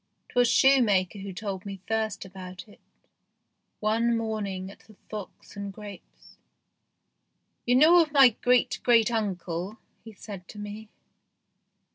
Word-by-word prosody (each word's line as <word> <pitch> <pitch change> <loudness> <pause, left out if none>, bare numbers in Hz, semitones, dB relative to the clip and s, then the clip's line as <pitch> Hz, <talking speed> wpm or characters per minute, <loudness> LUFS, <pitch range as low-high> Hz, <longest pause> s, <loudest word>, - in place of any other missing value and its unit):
Twas 245 -1 +3
shoemaker 220 -8 +3
who 195 0 -6
told 190 0 -5
me 195 -2 -7
first 220 -2 -2
about 185 0 -10
it 210 - -18 1.0
one 230 +2 +1
morning 200 -4 -4
at - - -16
the 215 - -19
" - - -40
Fox 210 -1 -9
and 200 0 -5
Grapes." 205 -1 -13 1.3
"You 245 - +4
know 330 +6 +7
ni}? 270 -4 +7
great 245 +2 +1
great 235 -2 +4
uncle? 190 -2 -3
" - - -43
he 225 - -11
said 195 -3 -10
to - - -12
me. 210 +1 -8
210 Hz, 135 wpm, -27 LUFS, 195-230 Hz, 1.3 s, know